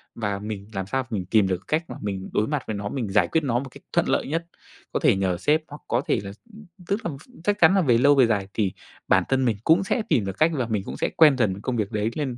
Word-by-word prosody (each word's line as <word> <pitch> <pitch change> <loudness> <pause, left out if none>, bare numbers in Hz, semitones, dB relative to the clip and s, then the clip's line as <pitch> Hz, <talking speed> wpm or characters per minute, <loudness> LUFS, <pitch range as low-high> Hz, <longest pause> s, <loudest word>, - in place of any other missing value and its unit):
Và 100 -3 -2
mình 105 -1 -6
làm 95 -1 -3
sao 135 +3 -1
mình 100 -5 -3
tìm 100 +1 +3
được 95 0 -3
cách 160 +2 0
mà - - -6
mình 95 -2 -4
đối 105 - +1
mặt 145 -3 -2
với 110 - -2
nó, 100 0 -4
mình 120 -5 -3
giải 95 -3 +3
quyết 160 - 0
nó 120 -4 +1
một 135 +1 -7
cách - - -15
thuận - - +2
lợi - - +1
nhất. 165 +4 -2 0.5
Có - - +1
thể - - +4
nhờ 95 -2 0
sếp 155 - +2
hoặc 145 0 -11
có 120 +2 +1
thể - - +2
là 100 - -6 0.6
tức 200 +3 -2
là 170 - -1
ph 150 - -18 0.2
chắc 205 0 +1
chắn 170 +4 +7
là 195 - +4
về 125 -8 +3
lâu, 140 +4 +5
về 130 -3 +5
dài 100 -4 0
thì 100 -4 0 0.3
bản - - +4
thân 130 -1 +2
mình 115 -4 +1
cũng 165 +8 +4
sẽ 220 +4 -1
tìm 105 - +2
được 95 0 -5
cách 160 +2 +4
là 125 -5 -1
mình 105 -4 -1
cũng - - -6
sẽ - - 0
quen 150 -5 +6
dần 100 -4 0
công 130 - -2
việc 105 -2 -2
đấy, 105 0 0
nên 130 -5 -3
115 Hz, 290 wpm, -24 LUFS, 100-145 Hz, 0.6 s, chắn